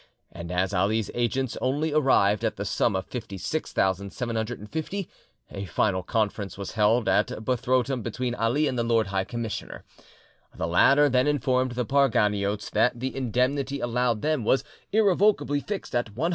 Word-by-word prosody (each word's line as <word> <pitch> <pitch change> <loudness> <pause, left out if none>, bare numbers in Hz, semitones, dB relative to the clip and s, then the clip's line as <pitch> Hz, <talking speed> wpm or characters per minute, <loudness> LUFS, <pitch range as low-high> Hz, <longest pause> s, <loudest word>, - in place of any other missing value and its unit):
And 85 +1 -8
as 95 +2 0
Ali's 100 +3 +1
agents 120 +1 -1
only 145 +4 0
arrived 110 -9 +3
at - - 0
the - - -4
sum - - +1
of 95 0 -2
56,750, 110 - -3 0.4
a 100 - -5
final 95 +3 0
conference 105 0 -2
was 100 -1 -5
held 110 +2 +2
at - - +3 0.2
Buthrotum 130 +1 0
between 120 +2 -3
Ali 120 +6 +1
and 125 - -2
the - - +1
Lord 115 -1 +2
High 95 -1 -1
Commissioner. 115 0 -5 0.7
The - - -1
latter 135 - +5
then 130 0 +2
informed 130 -3 +1
the 125 0 -2
Parganiotes 105 -6 +1
that 120 +3 +2
the 130 +2 -3
indemnity 135 +2 0
allowed 120 -2 0
them 155 -5 0
was 130 +4 +2 0.3
irrevocably 195 -8 +3
fixed 200 +6 -6
at 120 -1 0
150,000! 165 +6 +1
120 Hz, 150 wpm, -26 LUFS, 105-135 Hz, 0.7 s, latter